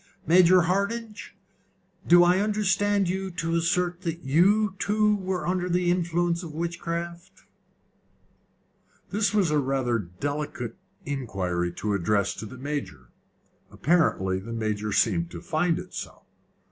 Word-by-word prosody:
Major 180 +2 +6
Hardinge, 205 +6 -2 0.7
do 175 +1 +7
I 180 +2 +4
understand 205 -1 +1
you 190 +2 -2
to 165 -1 -2
assert 175 +1 0
that 170 -1 -4
you 190 +9 +3
too 210 0 +2
were 185 -4 -3
under 180 0 -1
the 175 0 +2
influence 175 -1 0
of 160 -4 -8
witchcraft?" 170 +1 -5 1.7
This 205 -1 +1
was 200 -7 +2
rather 135 -4 +1
a 105 - -4
delicate 130 - -4 0.3
inquiry 95 -11 -2
to 105 +2 -2
address 100 +1 +1
to 110 - -6
the 130 - -11
Major. 130 - -5 0.6
Apparently 95 - +1
the 115 +5 -7
Major 105 -2 -2
seemed 170 +10 +1
to - - -8
find 165 +2 0
it 185 +1 -8
so. - - -7
170 Hz, 130 wpm, -26 LUFS, 130-185 Hz, 1.7 s, do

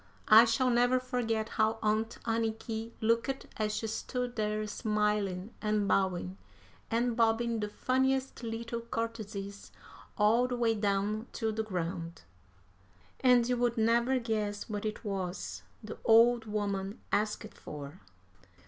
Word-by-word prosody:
I 220 +2 +10
shall 245 +2 +2
never 245 +1 +3
forget 240 -4 -1
how 220 +1 +1
Aunt 215 +1 0
Anniky 225 0 -2
looked 230 +4 +1
as 215 -1 -1
she - - -2
stood 245 +3 -3
there 215 0 -1
smiling 210 -2 -1
and 210 -1 +1
bowing, 190 -1 0 0.5
and 235 +1 +1
bobbing 230 0 +2
the 210 -1 -2
funniest 265 +4 0
little 230 0 -4
courtesies 215 -3 -5 0.5
all 225 +4 +4
the 250 - -2
way 235 -2 +2
down 210 +1 0
to 225 -1 -1
the 220 +1 -1
ground. 175 - -4 1.0
And 250 -2 +5
you 250 0 +1
would 240 0 +1
never 235 +3 +3
guess 215 -4 -2
what 210 -1 -4
it 215 +1 -6
was 190 -2 -4 0.2
the 215 - -8
old 230 +1 +5
woman 200 -2 -2
asked 215 +1 -1
for. 145 +3 -9
220 Hz, 130 wpm, -31 LUFS, 210-235 Hz, 1.0 s, I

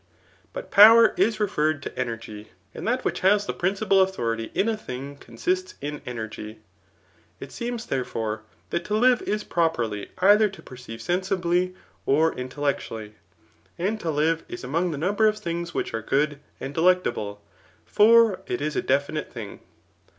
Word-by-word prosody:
But - - -8
power 225 +3 +8
is 220 0 +1
referred 155 -7 0
to - - -7
energy; 115 -4 -5 0.3
and - - -6
that 250 +2 0
which - - -1
has 205 +2 +3
the - - -3
principal 195 +1 +2
authority 115 -12 -1
in 205 - +2
a 225 - +1
thing 140 -8 -7
consists 180 +10 -3
in 150 +1 -5
energy, 110 -2 -6 0.8
ft - - -9
seems, 240 -1 -4
therefore, 110 -4 -3 0.3
that 170 - -1
to 210 - -1
live 250 +2 +4
is 210 0 -2
properly 120 - -1
either 205 +3 +5
to 195 - -13
perceive 125 -3 -10
sensibly, 180 - 0 0.3
or 160 +4 +3
intellectually; 125 -5 -4 0.6
and 205 +5 -1
to 170 - -3
live 160 +2 +1
is - - -8
among 165 +8 0
the 155 - -4
num 180 +7 0
ber 220 - +5
of 215 0 +1
things 170 -3 -4
which - - -2
are 115 - -2
good 145 +5 0 0.2
and 135 - -6
delectable; 160 - +1 0.5
for 225 -2 +5
it 120 - -2
is 150 +1 -2
a - - +1
definite 140 +3 -1
thing. 110 -5 -8
165 Hz, 160 wpm, -25 LUFS, 125-195 Hz, 0.8 s, power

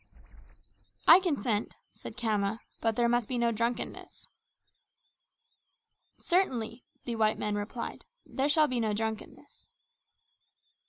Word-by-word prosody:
"I - - +10
consent," 250 - -1 0.2
said 225 - -10
Khama, 220 -2 -1 0.2
"but 225 -1 +1
there 235 0 +2
must 240 -2 +1
be 255 - -2
no 235 -1 +2
drunkenness." 230 +2 -3 1.9
"Certainly," 250 - 0 0.2
the 235 -2 -3
white 215 -1 +2
men 210 - -2
replied, 205 +3 -5 0.2
"there 275 +1 -1
shall 305 +1 +5
be 255 -3 -1
no 220 -2 0
drunkenness." 220 0 -6
230 Hz, 110 wpm, -30 LUFS, 220-250 Hz, 1.9 s, I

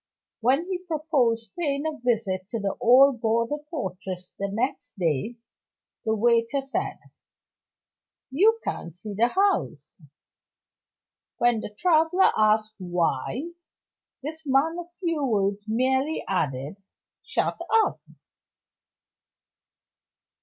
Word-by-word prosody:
When 265 +8 +2
he 370 -1 -3
proposed 290 - 0
paying 285 -3 -1
a 310 -1 -3
visit 205 -6 -1
to 230 - -3
the 200 -1 -2
old 250 +1 +6
border 230 +4 +1
fortress 185 - -5
the 200 - -1
next 235 +3 -3
day, 170 - -1 0.7
the 220 0 +1
waiter 235 +4 +2
said: 270 0 -3 1.3
"You 430 +11 +4
can't 170 0 -5
see 210 +3 -7
the 230 +4 +4
house." 245 - 0 1.4
When 240 -2 +3
the - - -5
traveler 325 - +3
asked 215 0 +3
Why, 180 - -1 0.7
this 315 +2 -6
man 295 +4 +2
of 345 - -7
few 330 -5 0
words 205 -5 0
merely 260 +6 0
added: 145 -3 -2 0.5
"Shut 470 - -1 0.2
up." - - -3
235 Hz, 105 wpm, -25 LUFS, 200-300 Hz, 1.4 s, old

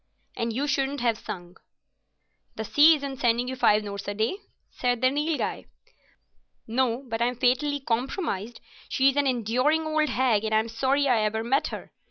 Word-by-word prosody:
"And 230 0 -2
you 265 +6 -1
shouldn't 280 -1 -1
have 230 -3 +1
sung." 175 0 -8 1.0
"The 220 - -4
sea 305 +7 +6
isn't 275 -3 -6
sending 240 0 +1
you 260 - -3
five 210 -4 +3
notes 200 -1 -6
a 205 - -3
day," 220 - -1 0.3
said 245 -1 -1
the 255 +1 +3
Nilghai. 300 +2 -2 1.0
"No, 245 +2 0
but 225 -1 -3
I'm 245 +1 +1
fatally 260 +4 +1
compromised. 240 - -3 0.3
She's 270 0 +3
an 285 -1 +2
enduring 255 +6 +1
old 310 -1 +1
hag, 245 -5 +1
and 220 0 0
I'm 220 +1 +1
sorry 270 +5 +1
I 245 -4 +3
ever 215 +1 -1
met 265 +5 +1
her. - - -8
250 Hz, 170 wpm, -26 LUFS, 225-280 Hz, 1.0 s, sea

